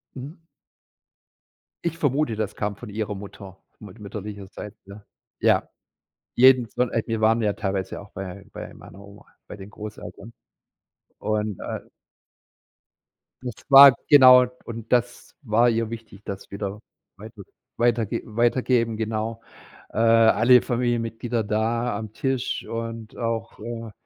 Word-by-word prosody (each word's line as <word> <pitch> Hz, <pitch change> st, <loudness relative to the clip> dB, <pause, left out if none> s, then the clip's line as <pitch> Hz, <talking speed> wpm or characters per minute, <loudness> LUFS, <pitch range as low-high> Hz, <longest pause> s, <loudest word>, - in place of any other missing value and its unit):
Mhm. 150 Hz, +6 st, -10 dB, 1.4 s
Ich 165 Hz, -1 st, -2 dB
vermute, 145 Hz, -5 st, 0 dB
das 105 Hz, -2 st, -3 dB
kam 105 Hz, -1 st, -3 dB
von 110 Hz, +2 st, -10 dB
ihrer 105 Hz, 0 st, -3 dB
Mutter, 95 Hz, -1 st, -11 dB, 0.2 s
mut 105 Hz, +1 st, -12 dB
mütterlicherseits, 100 Hz, 0 st, -8 dB
ja. 100 Hz, +1 st, -12 dB, 0.4 s
Ja! -, -, +2 dB, 0.7 s
Jeden 125 Hz, -2 st, +6 dB
zw 125 Hz, -, -3 dB
a 115 Hz, -2 st, -1 dB
wir 115 Hz, -1 st, -2 dB
waren 115 Hz, +1 st, +3 dB
ja 105 Hz, -2 st, +1 dB
teilweise 95 Hz, -2 st, -3 dB
auch 100 Hz, -, -13 dB
bei 95 Hz, 0 st, -8 dB
bei -, -, -8 dB
meiner -, -, -14 dB
Oma, 100 Hz, +1 st, -15 dB, 0.2 s
bei 105 Hz, -, -9 dB
den 95 Hz, 0 st, -11 dB
Großeltern. 105 Hz, +1 st, -10 dB, 0.9 s
Und, 105 Hz, -2 st, -2 dB
äh -, -, -5 dB, 1.6 s
Nicht 125 Hz, -3 st, -6 dB
spa 140 Hz, 0 st, +9 dB, 0.2 s
genau, 130 Hz, -3 st, +8 dB, 0.2 s
und 115 Hz, -1 st, -8 dB
das 120 Hz, -4 st, -1 dB
war 115 Hz, +3 st, +3 dB
ihr 115 Hz, -1 st, -1 dB
wichtig, 115 Hz, -3 st, -9 dB
das 100 Hz, -1 st, -7 dB
wieder 100 Hz, +1 st, -5 dB, 0.4 s
weiter 110 Hz, 0 st, -11 dB, 0.3 s
weiterge 120 Hz, -3 st, +1 dB
weitergeben, 120 Hz, 0 st, +1 dB
genau. 110 Hz, +1 st, -3 dB, 0.5 s
Äh, -, -, -7 dB
alle 115 Hz, +2 st, +5 dB
Familienmitglieder 120 Hz, -1 st, -1 dB
da 110 Hz, +2 st, -1 dB
am 110 Hz, 0 st, -6 dB
Tisch 130 Hz, 0 st, -2 dB
und 115 Hz, -1 st, -6 dB
auch, 115 Hz, -3 st, -3 dB
äh, 115 Hz, -1 st, -7 dB
115 Hz, 130 wpm, -24 LUFS, 105-120 Hz, 1.6 s, spa